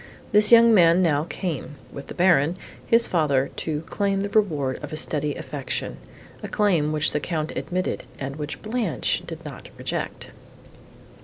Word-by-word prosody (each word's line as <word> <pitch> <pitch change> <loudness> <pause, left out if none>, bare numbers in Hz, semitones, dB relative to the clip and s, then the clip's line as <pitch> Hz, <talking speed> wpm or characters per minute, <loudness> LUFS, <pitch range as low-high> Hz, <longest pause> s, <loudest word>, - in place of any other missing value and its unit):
This 210 +1 +6
young 230 0 +8
man 175 -2 +5
now 150 -3 +2
came, 160 -6 -5 0.2
with 140 -1 -8
the - - -8
Baron, 175 -2 +3 0.3
his 230 0 +4
father, 140 -6 +1
to 155 -2 -2
claim 195 +4 -1
the 200 - -2
reward 155 -11 0
of - - -6
a 155 - -4
steady 150 -2 -1
affection, 140 -3 -5 0.4
a - - -5
claim, 175 -8 +1
which 155 -1 +2
the 150 - -1
Count 155 -1 -3
admitted 185 +1 -3
and 135 +1 -5
which 150 -1 -6
Blanche 225 +2 -1
did - - -8
not - - -9
reject. - - -5
165 Hz, 160 wpm, -24 LUFS, 150-200 Hz, 0.4 s, young